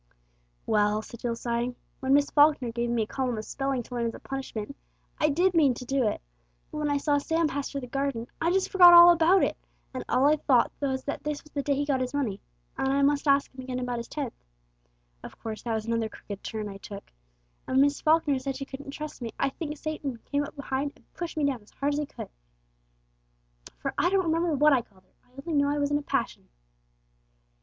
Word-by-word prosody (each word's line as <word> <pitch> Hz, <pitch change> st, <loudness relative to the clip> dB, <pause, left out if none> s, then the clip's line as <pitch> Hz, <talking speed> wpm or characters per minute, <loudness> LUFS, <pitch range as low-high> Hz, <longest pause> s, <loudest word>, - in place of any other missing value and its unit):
"Well," 210 Hz, 0 st, +2 dB
said 235 Hz, -, -11 dB
Jill, 235 Hz, -1 st, -2 dB
sighing; 235 Hz, +1 st, -2 dB, 0.2 s
"when 265 Hz, +1 st, +3 dB
Miss 285 Hz, 0 st, +2 dB
Falkner 290 Hz, -5 st, +4 dB
gave 235 Hz, +1 st, -2 dB
me 235 Hz, -2 st, +1 dB
a -, -, -3 dB
column 250 Hz, 0 st, -2 dB
of 215 Hz, -, -5 dB
spelling 270 Hz, -2 st, -2 dB
to 250 Hz, -, -12 dB
learn 235 Hz, -1 st, 0 dB
as 230 Hz, -, -4 dB
a -, -, -10 dB
punishment, 270 Hz, -2 st, -6 dB, 0.4 s
I 305 Hz, -, +3 dB
did 350 Hz, +5 st, +2 dB
mean 290 Hz, -7 st, +4 dB
to 250 Hz, -, -8 dB
do 265 Hz, -2 st, +1 dB
it; -, -, -1 dB, 0.5 s
but -, -, -5 dB
when 300 Hz, -1 st, 0 dB
I 285 Hz, -, +2 dB
saw 285 Hz, 0 st, +1 dB
Sam 325 Hz, +3 st, 0 dB
pass 285 Hz, -1 st, -3 dB
through 280 Hz, -, -4 dB
the -, -, -6 dB
garden, 275 Hz, -2 st, -2 dB, 0.2 s
I 330 Hz, -, +2 dB
just 380 Hz, +1 st, +1 dB
forgot 355 Hz, -2 st, +9 dB
all 345 Hz, 0 st, +11 dB
about 345 Hz, +3 st, +4 dB
it, -, -, +1 dB, 0.4 s
and 255 Hz, -, -4 dB
all 260 Hz, -, +3 dB
I 300 Hz, +1 st, +5 dB
thought 260 Hz, -5 st, +3 dB
was 265 Hz, -2 st, -1 dB
that 285 Hz, -, -4 dB
this 300 Hz, -1 st, -3 dB
was 300 Hz, -, -19 dB
the 285 Hz, -, -2 dB
day 280 Hz, 0 st, 0 dB
he 285 Hz, +1 st, -1 dB
got 275 Hz, -3 st, 0 dB
his 255 Hz, +2 st, -3 dB
money, 235 Hz, -9 st, -2 dB, 0.4 s
and 270 Hz, -, +1 dB
I 280 Hz, +1 st, +2 dB
must 285 Hz, +1 st, +2 dB
ask 280 Hz, 0 st, +3 dB
him 260 Hz, -, -8 dB
again 255 Hz, -1 st, -4 dB
about 245 Hz, -1 st, -2 dB
his 235 Hz, -, -6 dB
tenth 280 Hz, -6 st, -4 dB, 0.9 s
of -, -, -10 dB
course 220 Hz, -1 st, -6 dB
that 235 Hz, -, -2 dB
was 220 Hz, -1 st, -3 dB
another 230 Hz, -1 st, -1 dB
crooked 200 Hz, -1 st, -9 dB
turn 215 Hz, -1 st, -4 dB
I 195 Hz, -1 st, -8 dB
took; 200 Hz, 0 st, -9 dB, 0.6 s
and 260 Hz, -, 0 dB
when -, -, +7 dB
Miss 285 Hz, 0 st, +2 dB
Falkner 310 Hz, -3 st, +3 dB
said 270 Hz, 0 st, -4 dB
she 275 Hz, +1 st, -5 dB
couldn't 275 Hz, +1 st, -9 dB
trust 300 Hz, 0 st, -7 dB
me 230 Hz, -2 st, -5 dB
I -, -, +1 dB
think 300 Hz, +2 st, -6 dB
Satan 290 Hz, -5 st, -4 dB
came 285 Hz, 0 st, +1 dB
up 285 Hz, -, -8 dB
behind 280 Hz, 0 st, -3 dB
and -, -, -27 dB
pushed 345 Hz, -2 st, -6 dB
me 300 Hz, -, +2 dB
down 265 Hz, -5 st, -1 dB
as 205 Hz, -, -21 dB
hard 285 Hz, +1 st, -2 dB
as 290 Hz, -, -1 dB
he 300 Hz, -, -2 dB
could. -, -, -9 dB, 1.5 s
For -, -, -4 dB
I 350 Hz, -, +3 dB
don't 380 Hz, -1 st, +2 dB
remember 330 Hz, 0 st, +1 dB
what 300 Hz, +1 st, +5 dB
I 255 Hz, -, +3 dB
called 190 Hz, -4 st, -24 dB
her! 185 Hz, -, -36 dB
I 255 Hz, +2 st, -14 dB
only 290 Hz, 0 st, 0 dB
know 285 Hz, -, +1 dB
I 290 Hz, -, 0 dB
was 285 Hz, 0 st, 0 dB
in 290 Hz, -, +3 dB
a -, -, -7 dB
passion." -, -, -2 dB
275 Hz, 240 wpm, -27 LUFS, 240-295 Hz, 1.5 s, all